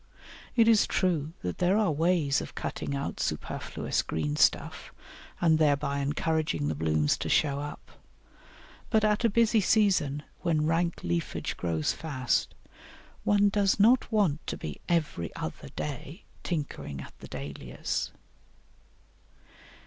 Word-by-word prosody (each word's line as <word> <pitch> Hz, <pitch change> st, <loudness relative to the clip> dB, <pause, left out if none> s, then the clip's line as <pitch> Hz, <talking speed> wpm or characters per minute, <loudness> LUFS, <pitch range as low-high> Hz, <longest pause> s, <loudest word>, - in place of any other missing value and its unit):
It 230 Hz, -2 st, +5 dB
is 225 Hz, -2 st, +5 dB
true 165 Hz, -5 st, 0 dB
that 90 Hz, 0 st, -3 dB
there 180 Hz, +3 st, +3 dB
are 210 Hz, -6 st, +2 dB
ways 155 Hz, -2 st, +2 dB
of -, -, -8 dB
cutting 140 Hz, -, -3 dB
out 140 Hz, -, -4 dB
superfluous -, -, -2 dB
green 75 Hz, -2 st, -2 dB
stuff -, -, +1 dB, 0.5 s
and 160 Hz, -2 st, +4 dB
thereby 145 Hz, -2 st, +2 dB
encouraging 145 Hz, -, 0 dB
the -, -, 0 dB
blooms 75 Hz, -1 st, +1 dB
to -, -, -3 dB
show 140 Hz, -2 st, +2 dB
up, 145 Hz, 0 st, -7 dB, 1.0 s
but 220 Hz, -2 st, +3 dB
at 210 Hz, +2 st, +2 dB
a 230 Hz, -, +5 dB
busy 225 Hz, 0 st, +3 dB
season, 180 Hz, -9 st, +2 dB, 0.2 s
when 155 Hz, -3 st, +1 dB
rank 170 Hz, +1 st, 0 dB
leafage 85 Hz, 0 st, -2 dB
grows 80 Hz, -3 st, -1 dB
fast, 140 Hz, -5 st, -1 dB, 0.7 s
one 205 Hz, 0 st, +4 dB
does 200 Hz, -1 st, +2 dB
not 235 Hz, +4 st, +4 dB
want 190 Hz, -9 st, +1 dB
to -, -, -3 dB
be -, -, -7 dB
every 155 Hz, -, 0 dB
other 80 Hz, -, -6 dB
day 150 Hz, -, -5 dB, 0.2 s
tinkering 145 Hz, -, -4 dB
at -, -, -11 dB
the -, -, -10 dB
Dahlias. 70 Hz, 0 st, -4 dB
155 Hz, 135 wpm, -28 LUFS, 135-195 Hz, 1.0 s, It